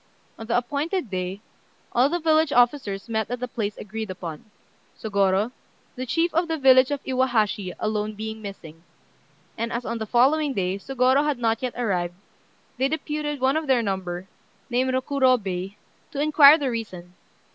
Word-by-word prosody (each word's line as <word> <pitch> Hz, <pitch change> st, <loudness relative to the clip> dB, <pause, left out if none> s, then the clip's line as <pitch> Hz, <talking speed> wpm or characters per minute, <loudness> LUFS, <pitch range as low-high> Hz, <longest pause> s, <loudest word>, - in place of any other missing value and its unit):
On 225 Hz, -, -8 dB
the 235 Hz, -, +2 dB
appointed 285 Hz, -, -2 dB
day 185 Hz, +2 st, -3 dB, 0.5 s
all 250 Hz, +3 st, +3 dB
the 345 Hz, -, 0 dB
village 315 Hz, -2 st, +3 dB
officers 240 Hz, -6 st, +1 dB
met 220 Hz, -2 st, -2 dB
at 245 Hz, 0 st, -3 dB
the 250 Hz, -, -3 dB
place 210 Hz, -4 st, -4 dB
agreed 220 Hz, +1 st, -6 dB
upon, 170 Hz, -4 st, -7 dB, 0.5 s
Sôgorô, 200 Hz, +1 st, +1 dB, 0.4 s
the 255 Hz, 0 st, -5 dB
chief 330 Hz, +7 st, +1 dB
of 335 Hz, +2 st, +1 dB
the 325 Hz, -1 st, -1 dB
village 260 Hz, -2 st, +6 dB
of 285 Hz, -1 st, -3 dB
Iwahashi, 220 Hz, -7 st, 0 dB
alone 215 Hz, 0 st, -2 dB
being 220 Hz, +1 st, -6 dB
missing; 165 Hz, -6 st, -9 dB, 0.8 s
and 230 Hz, +1 st, -2 dB
as 235 Hz, +1 st, -3 dB
on 230 Hz, -, -3 dB
the 220 Hz, -, -4 dB
following 275 Hz, +5 st, +3 dB
day 190 Hz, 0 st, -1 dB
Sôgorô 260 Hz, +4 st, +2 dB
had 295 Hz, -3 st, 0 dB
not 225 Hz, -1 st, 0 dB
yet 255 Hz, -2 st, -3 dB
arrived, 180 Hz, -7 st, -1 dB, 0.6 s
they 265 Hz, -, +3 dB
deputed 300 Hz, -1 st, -3 dB
one 265 Hz, +2 st, +2 dB
of 315 Hz, -1 st, -1 dB
their 255 Hz, -3 st, +3 dB
number, 190 Hz, -2 st, -3 dB, 0.4 s
named 255 Hz, +2 st, +1 dB
Rokurobei, 255 Hz, -8 st, 0 dB, 0.4 s
to 285 Hz, -, -5 dB
inquire 300 Hz, 0 st, +7 dB
the 280 Hz, -5 st, -1 dB
reason. 185 Hz, -6 st, -6 dB
240 Hz, 165 wpm, -24 LUFS, 200-275 Hz, 0.8 s, inquire